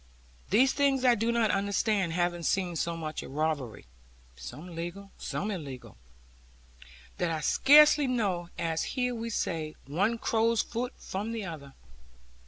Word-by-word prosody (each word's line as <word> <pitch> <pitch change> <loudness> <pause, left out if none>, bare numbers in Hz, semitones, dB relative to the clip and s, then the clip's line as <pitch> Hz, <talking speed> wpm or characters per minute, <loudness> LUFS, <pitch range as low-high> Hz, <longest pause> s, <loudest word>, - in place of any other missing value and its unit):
These 255 +7 +4
things 275 -2 +2
I 245 - +7
do 230 +1 0
not 230 -2 +2
understand; 200 -2 0
having 175 0 0
seen 180 0 0
so 170 +1 -2
much 155 -1 -4
of - - -10
robbery 150 -6 -2 0.5
(some 140 - -9
legal, 175 +4 -6
some 210 +2 -3
illegal), 140 -9 -7 1.2
that 175 - +1
I 160 -1 -2
scarcely 295 - +6
know, 195 -9 -1
as 165 -1 -1
here 250 -1 +1
we 230 0 -4
say, 160 -7 -2
one 195 - 0
crow's 225 0 +1
foot 245 +2 -4
from 210 +4 -4
the 220 -3 -4
other. 145 -6 -8
190 Hz, 145 wpm, -29 LUFS, 165-230 Hz, 1.2 s, I